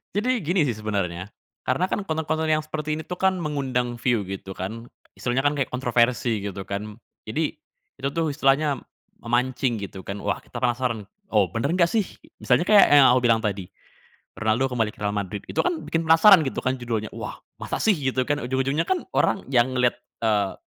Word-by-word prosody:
Jadi 245 Hz, +3 st, +1 dB
gini 175 Hz, 0 st, +1 dB
sih 130 Hz, -, +1 dB
sebenarnya 100 Hz, -4 st, -3 dB, 0.4 s
karena 175 Hz, +9 st, +1 dB
kan 200 Hz, -, -2 dB
konten-konten 160 Hz, -1 st, -1 dB
yang 155 Hz, 0 st, +2 dB
seperti 155 Hz, 0 st, -3 dB
ini 160 Hz, -, -4 dB
tuh 180 Hz, -, -6 dB
kan 190 Hz, 0 st, +2 dB
mengundang 130 Hz, -5 st, -2 dB
view 120 Hz, -3 st, +1 dB
gitu 95 Hz, 0 st, -6 dB
kan, 110 Hz, +6 st, -6 dB, 0.3 s
istilahnya 125 Hz, +2 st, 0 dB
kan 145 Hz, 0 st, +3 dB
kayak 140 Hz, -, 0 dB
kontroversi 120 Hz, -3 st, +1 dB
gitu 95 Hz, -1 st, -5 dB
kan. 105 Hz, +2 st, -5 dB, 0.3 s
Jadi 150 Hz, +7 st, -2 dB, 0.4 s
itu 135 Hz, -, -1 dB
tuh 165 Hz, -2 st, 0 dB
istilahnya 140 Hz, 0 st, +2 dB, 0.4 s
memancing 120 Hz, -1 st, 0 dB
gitu 95 Hz, -1 st, -8 dB
kan 100 Hz, +1 st, -5 dB
wah -, -, 0 dB
kita -, -, -9 dB
penasaran, 120 Hz, -3 st, 0 dB, 0.3 s
"Oh, 100 Hz, -5 st, +4 dB
benar 140 Hz, +8 st, -1 dB
nggak 170 Hz, -2 st, +3 dB
sih?" 215 Hz, -4 st, +1 dB, 0.3 s
Misalnya 170 Hz, -, +2 dB
kayak 210 Hz, -2 st, +8 dB
yang 140 Hz, -2 st, +8 dB
aku 125 Hz, -, +4 dB
bilang 115 Hz, -1 st, +4 dB
tadi 100 Hz, -3 st, -2 dB, 0.7 s
"Ronaldo 115 Hz, +4 st, +1 dB
kembali 110 Hz, -3 st, 0 dB
ke -, -, -21 dB
Real 105 Hz, 0 st, 0 dB
Madrid." 100 Hz, 0 st, -4 dB
Itu -, -, -3 dB
kan 355 Hz, -2 st, 0 dB
bikin 165 Hz, 0 st, -1 dB
penasaran 165 Hz, 0 st, +7 dB
gitu -, -, -3 dB
kan 130 Hz, +1 st, 0 dB
judulnya, 115 Hz, -3 st, -3 dB
"Wah, -, -, -6 dB, 0.2 s
masa -, -, -3 dB
sih?" 210 Hz, -6 st, +4 dB
Gitu 130 Hz, -2 st, 0 dB
kan, 145 Hz, +2 st, 0 dB
ujung-ujungnya 135 Hz, +4 st, 0 dB
kan 375 Hz, -2 st, 0 dB
orang 195 Hz, -, +1 dB
yang 125 Hz, +1 st, +3 dB
ngelihat, 125 Hz, -1 st, +2 dB, 0.3 s
eee, 105 Hz, -3 st, +1 dB
130 Hz, 190 wpm, -24 LUFS, 110-155 Hz, 0.7 s, kayak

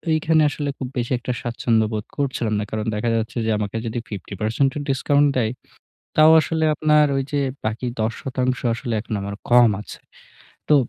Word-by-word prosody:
এখানে 155 Hz, 0 st, +3 dB
আসলে 145 Hz, 0 st, -3 dB
খুব 130 Hz, -, -4 dB
বেশি 120 Hz, -1 st, -2 dB
একটা 125 Hz, +1 st, -3 dB
স্বাচ্ছন্দ্য 115 Hz, -2 st, +1 dB
বোধ 105 Hz, -1 st, -3 dB
করছিলাম 130 Hz, -6 st, -1 dB
না। -, -, -1 dB
কারণ 110 Hz, 0 st, -2 dB
দেখা 105 Hz, +3 st, -1 dB
যাচ্ছে 115 Hz, +2 st, -3 dB
যে 110 Hz, -, +1 dB
আমাকে 105 Hz, +1 st, -3 dB
যদি 115 Hz, +1 st, -3 dB
50% 105 Hz, +6 st, -1 dB
ও -, -, -2 dB
discount 145 Hz, +2 st, +3 dB
দেয় 110 Hz, -3 st, +1 dB, 0.7 s
তাও 155 Hz, +1 st, +8 dB
আসলে 160 Hz, 0 st, 0 dB
আপনার 150 Hz, -1 st, +4 dB
ওই 135 Hz, -, 0 dB
যে 145 Hz, -, +2 dB, 0.2 s
বাকি 110 Hz, +3 st, -2 dB
১০% 125 Hz, +3 st, -1 dB
আসলে 120 Hz, 0 st, -4 dB
এখন 110 Hz, -, -7 dB
আমার 100 Hz, 0 st, -5 dB
কম 120 Hz, -1 st, +7 dB
আছে। -, -, -10 dB, 0.7 s
তো 150 Hz, -, +6 dB
120 Hz, 175 wpm, -22 LUFS, 110-145 Hz, 0.7 s, তাও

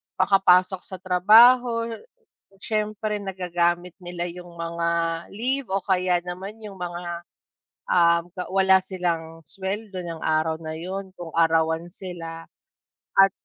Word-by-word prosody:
makapasok 185 Hz, -1 st, +4 dB
sa 190 Hz, -, -6 dB
trabaho. 230 Hz, +6 st, +6 dB, 0.8 s
Siyempre 215 Hz, -1 st, -2 dB
nagagamit 175 Hz, -2 st, -1 dB
nila 175 Hz, -1 st, -5 dB
'yung 175 Hz, 0 st, -9 dB
mga 170 Hz, 0 st, -3 dB, 0.5 s
leave 260 Hz, +3 st, -1 dB
o 195 Hz, 0 st, -1 dB
kaya 180 Hz, -2 st, +2 dB
naman 190 Hz, +5 st, -7 dB
'yung 195 Hz, -3 st, -9 dB
mga, 175 Hz, -1 st, -5 dB, 0.6 s
um, 170 Hz, -1 st, +4 dB
ga 180 Hz, -1 st, -4 dB
wala 190 Hz, 0 st, +5 dB
silang 165 Hz, -3 st, -3 dB
sweldo 195 Hz, +5 st, -5 dB
nung 165 Hz, -1 st, -6 dB
araw 160 Hz, 0 st, +1 dB
na 160 Hz, 0 st, -5 dB
'yun, 190 Hz, +3 st, -5 dB
kung 170 Hz, -2 st, -8 dB
arawan 165 Hz, 0 st, +2 dB
sila 165 Hz, -3 st, -8 dB, 0.7 s
at 195 Hz, 0 st, +7 dB
180 Hz, 120 wpm, -24 LUFS, 170-195 Hz, 0.8 s, at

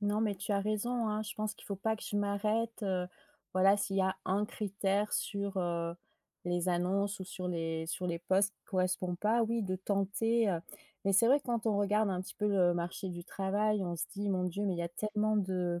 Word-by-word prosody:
non 205 Hz, +1 st, +1 dB
mais 215 Hz, -2 st, +1 dB
tu 200 Hz, +2 st, -3 dB
as 200 Hz, -, +2 dB
raison 220 Hz, +3 st, 0 dB
hein, 215 Hz, 0 st, 0 dB
je 210 Hz, -, -6 dB
pense 215 Hz, 0 st, -2 dB
qu'il -, -, -15 dB
faut 200 Hz, -, -3 dB
pas 220 Hz, +3 st, 0 dB
que -, -, -12 dB
je 205 Hz, -, -3 dB
m'arrête, 215 Hz, +3 st, 0 dB
heu. 185 Hz, -3 st, 0 dB, 0.5 s
Voilà 190 Hz, +2 st, +5 dB
s'il 200 Hz, -1 st, -1 dB
y -, -, +4 dB
a 190 Hz, 0 st, +1 dB
un 195 Hz, +3 st, +1 dB
critère 200 Hz, 0 st, -1 dB
sur, 200 Hz, -1 st, -1 dB
heu, 170 Hz, -1 st, -1 dB, 0.5 s
les 175 Hz, 0 st, 0 dB
annonces 195 Hz, +3 st, 0 dB
ou 190 Hz, -, -3 dB
sur 180 Hz, 0 st, -5 dB
les 165 Hz, -2 st, -2 dB
sur 180 Hz, +2 st, -2 dB
les 170 Hz, -1 st, -1 dB
postes 195 Hz, +3 st, +2 dB
qui -, -, -50 dB
correspond 185 Hz, -1 st, 0 dB
pas, 220 Hz, +5 st, +2 dB
oui 230 Hz, 0 st, 0 dB
de 185 Hz, -1 st, -1 dB
tenter, 200 Hz, +4 st, +1 dB
heu. 170 Hz, -3 st, +1 dB, 0.4 s
Mais 195 Hz, -, +3 dB
c'est 215 Hz, +4 st, +6 dB
vrai 275 Hz, +4 st, +5 dB
quand 235 Hz, -3 st, -1 dB
on 210 Hz, -, +3 dB
regarde 210 Hz, +1 st, +3 dB
un 185 Hz, -1 st, -1 dB
petit -, -, -9 dB
peu 210 Hz, -, -1 dB
le 180 Hz, -3 st, +4 dB
marché 175 Hz, +2 st, -3 dB
du 175 Hz, 0 st, -6 dB
travail, 200 Hz, +2 st, 0 dB
on 175 Hz, -1 st, -2 dB
se 170 Hz, -, -2 dB
dit: 205 Hz, 0 st, -1 dB
«Mon 185 Hz, -1 st, +1 dB
dieu 180 Hz, +3 st, -2 dB
mais 195 Hz, -, +1 dB
il -, -, -5 dB
y -, -, 0 dB
a 170 Hz, -, -2 dB
tellement 215 Hz, +4 st, 0 dB
de 180 Hz, -3 st, 0 dB
200 Hz, 235 wpm, -33 LUFS, 180-210 Hz, 0.5 s, c'est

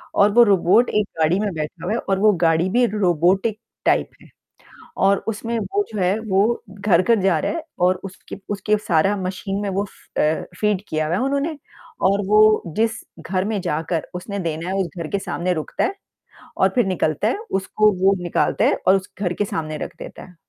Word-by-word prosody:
और 200 Hz, +1 st, +5 dB
वो 240 Hz, 0 st, +8 dB
रोबोट 200 Hz, +3 st, +4 dB
एक 210 Hz, -1 st, +1 dB
गाड़ी 165 Hz, +5 st, +3 dB
में 205 Hz, -3 st, -1 dB
बैठा 155 Hz, -1 st, -5 dB
हुआ 200 Hz, -, -2 dB
है 235 Hz, -, 0 dB
और 195 Hz, -1 st, -1 dB
वो 210 Hz, +1 st, +5 dB
गाड़ी 165 Hz, +2 st, +3 dB
भी 245 Hz, +4 st, +3 dB
रोबोटिक 195 Hz, +2 st, +1 dB, 0.3 s
टाइप -, -, +2 dB
है। -, -, -16 dB, 0.8 s
और 195 Hz, 0 st, +4 dB
उसमें 230 Hz, +2 st, -2 dB
वो 405 Hz, -, -1 dB
जो 210 Hz, -, -4 dB
है 185 Hz, +4 st, +2 dB
वो 200 Hz, +5 st, +2 dB
घर-घर 200 Hz, +2 st, +2 dB
जा 185 Hz, -4 st, +2 dB
रहा -, -, -1 dB
है 330 Hz, -1 st, -4 dB, 0.2 s
और 185 Hz, 0 st, +1 dB
उसकी 190 Hz, +1 st, -9 dB
उसके 205 Hz, +1 st, +1 dB
सारा 190 Hz, +1 st, +2 dB
मशीन 195 Hz, +1 st, -3 dB
में 205 Hz, -, -2 dB
वो 195 Hz, +2 st, -1 dB
फ -, -, -13 dB
अ, 155 Hz, +1 st, +1 dB, 0.2 s
फ़ीड 210 Hz, -2 st, +1 dB
किया 155 Hz, -1 st, -1 dB
है 175 Hz, +4 st, 0 dB
उन्होंने। 280 Hz, +3 st, -1 dB, 0.5 s
और 200 Hz, +2 st, +3 dB
वो 215 Hz, +1 st, +5 dB
जिस 225 Hz, 0 st, 0 dB, 0.2 s
घर 185 Hz, +2 st, -1 dB
में 210 Hz, -2 st, -1 dB
जाकर 160 Hz, +1 st, -2 dB
उसने 200 Hz, +3 st, -5 dB
देना 165 Hz, -1 st, -3 dB
है 190 Hz, -, -2 dB
उस 190 Hz, -3 st, 0 dB
घर 165 Hz, -2 st, -4 dB
के 200 Hz, -, -1 dB
सामने 180 Hz, -2 st, -2 dB
रुकता 155 Hz, -, -2 dB
है 395 Hz, -, -1 dB, 0.6 s
और -, -, +4 dB
फिर 245 Hz, -5 st, +2 dB
निकलता 180 Hz, +1 st, 0 dB
है 325 Hz, -, -1 dB, 0.2 s
उसको 215 Hz, +2 st, +2 dB
वो 195 Hz, +1 st, +5 dB
निकालता 175 Hz, -, +1 dB
है -, -, +3 dB
और 190 Hz, +1 st, +6 dB
उस 190 Hz, -, -5 dB
घर 180 Hz, -3 st, 0 dB
के 205 Hz, -, -1 dB
सामने 160 Hz, -7 st, -4 dB
रख -, -, -11 dB
देता -, -, -9 dB
है। 180 Hz, -, -16 dB
195 Hz, 205 wpm, -21 LUFS, 180-215 Hz, 0.8 s, वो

